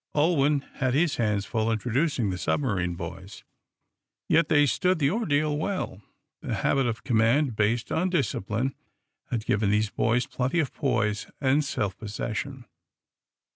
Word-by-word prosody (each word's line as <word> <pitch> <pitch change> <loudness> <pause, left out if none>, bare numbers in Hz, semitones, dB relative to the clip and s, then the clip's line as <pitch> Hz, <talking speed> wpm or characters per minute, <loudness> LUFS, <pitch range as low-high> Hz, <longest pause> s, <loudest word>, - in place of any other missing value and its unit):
Ulwin 150 -2 +3 0.2
had 130 0 +1
his 155 0 +2
hands 105 -3 0
full 110 -1 0
introducing 125 - 0
the 90 - -4
submarine 95 - 0
boys. 90 +3 -8 0.8
Yet 165 -1 +3
they 145 -1 +5
stood 180 +6 +1
the 140 -2 +2
ordeal 155 -9 +1
well. 155 - -3 0.4
The - - -3
habit 135 -2 +1
of 115 -1 -3
command, 120 +3 +2
based 110 +3 0
on 180 +3 +1
discipline, 130 - -1 0.6
had 115 -2 -2
given 100 0 +1
these 105 +1 +1
boys 120 +2 +1
plenty 130 +7 -1
of 150 -5 -1
poise 105 -6 0
and 140 +2 +2
self 100 -8 -2
possession. 115 +4 -4
125 Hz, 140 wpm, -26 LUFS, 105-145 Hz, 0.8 s, they